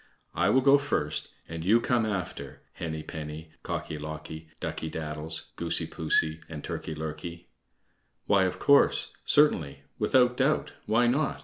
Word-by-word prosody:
I - - +2
will 130 - +5
go 140 +1 +6
first 140 - -1 0.2
and 80 0 -5
you 105 +6 +5
come 120 -1 +1
after, 95 -5 -4
Henny 80 -2 -4
penny, 80 +1 -7
Cocky 75 - -4
locky, 80 +1 -7
Ducky 80 - -4
daddles, 80 0 -5
Goosey - - -1
poosey, 80 0 +1
and 75 -3 -7
Turkey 80 - -4
lurkey." 85 +3 -6 0.8
"Why, 100 -2 +4
of 95 0 -2
course, 140 +8 +4
certainly, 80 - +3 0.2
without 125 -1 +4
doubt, 140 +3 +1
why 115 +3 +4
not?" 135 +5 +1
80 Hz, 140 wpm, -28 LUFS, 80-120 Hz, 0.8 s, go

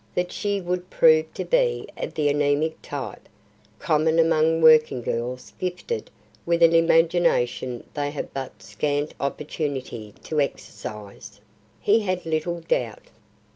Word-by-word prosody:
That 180 0 -1
she 205 -1 -1
would 180 0 -3
prove 160 -1 +4
to - - -3
be - - +1
of - - -6
the 150 -1 +1
anemic 145 +2 +1
type, 130 -8 -7 0.5
common 160 +3 +1
among 165 0 +3
working 155 -5 +5
girls 125 +3 -4
gifted 185 - -4 0.3
with 170 0 +2
an 165 0 +6
imagination 165 -7 +2
they 145 -1 -2
have 145 - -6
but 135 -1 -7
scant 145 0 -2
opportunity 140 -6 -4
to 155 -2 0
exercise, 105 -6 -6 0.4
he 215 +3 +3
had 185 -4 -2
little 165 +2 -2
doubt. 120 -9 -2
155 Hz, 130 wpm, -24 LUFS, 140-170 Hz, 0.5 s, an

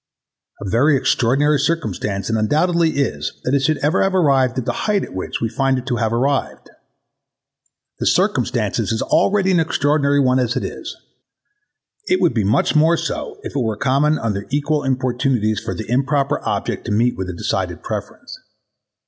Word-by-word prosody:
A 100 - -6
very 135 +8 +3
extraordinary 135 +3 +2
circumstance 105 - -2
it 115 - 0
undoubtedly 160 +9 +1
is 140 - -2
that 125 - -1
it 140 - +4
should 145 +2 +1
ever 155 +5 +2
have 195 0 +1
arrived 135 -7 +2
at 130 - -2
the - - -1 0.2
heighth 205 -2 +2
at - - -9
which 95 - -4
we 115 - +1
find 135 +4 0
it 125 - -5
to 125 -3 -1
have 110 -1 0
arrived. 135 +4 -1 1.3
The - - -1
circumstance - - +1
is 110 - -1
already 195 -1 +2
an 180 - +3
extraordinary 145 -2 +1
one 130 -1 +3
as 125 -1 0
it - - -1
is: - - -6 1.1
it 365 - +2
would - - +2
be 110 -3 0
much 110 +10 +1
more 160 +2 +4
so 435 - -4
if - - -7
it - - +1
were 110 -3 -1
common 140 +6 +2
under 105 -3 -3
equal 145 +2 0
importunities 125 -4 0
for - - -5
the 110 - -6
improper 140 +3 0
object - - -3
to - - -3
meet 115 +4 +2
with 95 -1 -5
a - - -4
decided 85 - -3
preference. - - -6
135 Hz, 180 wpm, -19 LUFS, 115-150 Hz, 1.3 s, it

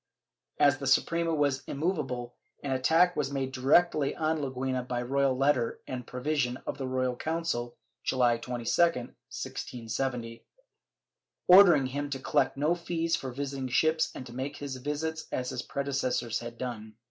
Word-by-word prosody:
As 140 -2 +4
the 135 - -4
Suprema 165 +5 +2
was 145 -2 +1
immovable, 135 -7 -2 0.3
an 140 - -2
attack 165 +7 +3
was 140 -2 -1
made 135 -1 -2
directly 140 +3 +3
on 160 0 0
Leguina 130 -1 -2
by 125 -1 -2
a - - -4
royal 135 0 +1
letter 135 -4 +1
and 125 -1 -6
provision 125 -1 -1
of 140 - -4
the 135 - -3
Royal 130 -1 0
Council, 155 -6 -2 0.3
January 120 -3 +2
22, 125 0 -5 0.2
1670, 125 -4 -3 1.0
ordering 180 -7 +8
him 145 +2 -3
to 140 - -2
collect 135 - +1
no 150 +4 +2
fees 170 -1 -1
for 130 -5 -5
visiting 135 0 -4
ships 155 +5 +2
and 130 - -7
to 120 - -10
make 135 +3 -4
his 140 -2 -5
visits 150 +4 -3
as 125 0 -2
his 125 -2 -3
predecessors 130 -4 -1
had 120 0 -8
done. 110 -4 -6
135 Hz, 155 wpm, -29 LUFS, 125-150 Hz, 1.0 s, ordering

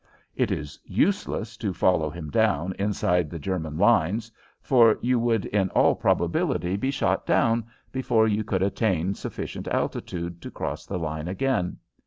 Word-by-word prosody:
It - - +1
is 70 0 -4
useless 150 - 0
to 100 -5 -3
follow 85 -4 +2
him 80 -2 -7
down 90 +7 +1
inside 90 -5 +1
the 85 - -6
German 80 -1 -3
lines, 105 +2 +2 0.3
for 115 -4 +5
you 125 0 +1
would 115 -3 +1
in 100 -2 0
all - - +5
probability 90 +2 0
be 120 +7 -1
shot 140 +1 0
down 115 -1 +2 0.2
before 125 -4 +2
you 110 0 +1
could 95 -2 0
attain 95 -3 +1
sufficient - - -6
altitude 85 -1 -3
to - - -7
cross - - -5
the 95 - -3
line 80 -1 -4
again. 95 -2 -1
95 Hz, 155 wpm, -25 LUFS, 85-115 Hz, 0.3 s, for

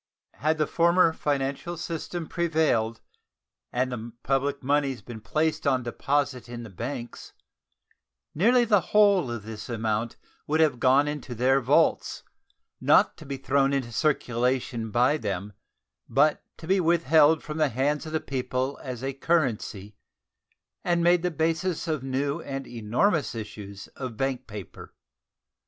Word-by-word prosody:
Had 155 +2 0
the 155 - +2
former 170 +1 +3
financial 145 +4 -2
system 170 0 -4
prevailed 155 -10 0 0.7
and 125 +1 0
the 115 -1 -6
public 140 +1 0
moneys 140 -2 +1
been 115 -3 -9
placed 155 +7 -1
on 130 -2 +2
deposit 135 +1 -1
in 120 -1 -6
the 110 - -10
banks, 120 +5 -6 1.0
nearly 240 +9 +4
the 205 -4 +4
whole 200 -6 +4
of 120 -3 -5
this 110 +2 -8
amount 110 0 -1 0.3
would 155 +2 +1
have 150 -6 +3
gone 135 +4 +4
into 145 -4 -5
their 130 +3 +3
vaults, 145 +6 +2 0.6
not - - +4
to - - -12
be 140 -1 -4
thrown 135 +1 +1
into 130 -4 -1
circulation 125 -3 0
by 125 +7 +3
them, 100 -4 -4 0.6
but 150 +2 +3
to 160 - -10
be 190 +3 +2
withheld 160 -2 +4
from 150 +1 -5
the 155 -2 +3
hands 145 +5 -1
of - - -6
the 160 - 0
people 130 0 -3
as 125 -2 -6
a 135 0 -2
currency 125 - -1 0.9
and 175 -1 +1
made 175 0 +4
the 180 - 0
basis 165 +2 -1
of 155 -4 -1
new 140 +4 -2
and 135 -2 -5
enormous 120 - 0
issues 105 -2 -8
of 130 -5 -7
bank 130 -1 -2
paper. 105 -3 -10
135 Hz, 145 wpm, -26 LUFS, 120-160 Hz, 1.0 s, nearly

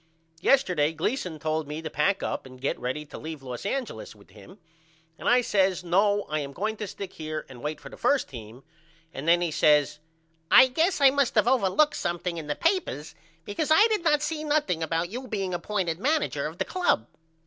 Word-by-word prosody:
Yesterday 175 - +3
Gleason 175 - -2
told 155 -1 -2
me 150 +1 -5
to 160 - -5
pack 195 +7 +1
up - - -3
and 130 0 -14
get 140 - -2
ready 130 +5 -3
to - - -10
leave 155 -3 -7
Los 125 +7 -5
Angeles 230 - -4
with 100 -3 -20
him 105 - -15 0.6
and - - -1
I 250 +1 +5
says 190 -5 +1
No 200 +4 +2
I 155 0 -3
am 140 -1 -5
going 215 +6 -2
to 210 - -4
stick 195 0 -7
here 155 -1 -5
and 125 -2 -12
wait 150 0 -4
for - - -11
the - - -12
1st 270 +3 +2
team 115 0 -11 0.5
and 140 +4 -6
then 175 +1 +5
he 170 -2 0
says 150 -1 +3 0.5
I 260 0 +8
guess 320 +5 +1
I 275 -1 +7
must 275 -4 +1
of 215 - +4
overlooked 260 +5 +3
something 175 0 -3
in 155 - -8
the 150 - -1
papers 330 - -1 0.3
because 245 +10 -2
I 320 +7 +7
did 425 -5 0
not 300 -3 +3
see 310 0 -2
nothing 295 - 0
about 165 +2 -1
you 255 +3 -6
being 195 -5 -3
appointed 175 -2 -2
manager 300 +8 0
of - - -9
the - - -1
club. 355 - +1
180 Hz, 205 wpm, -26 LUFS, -, 0.6 s, I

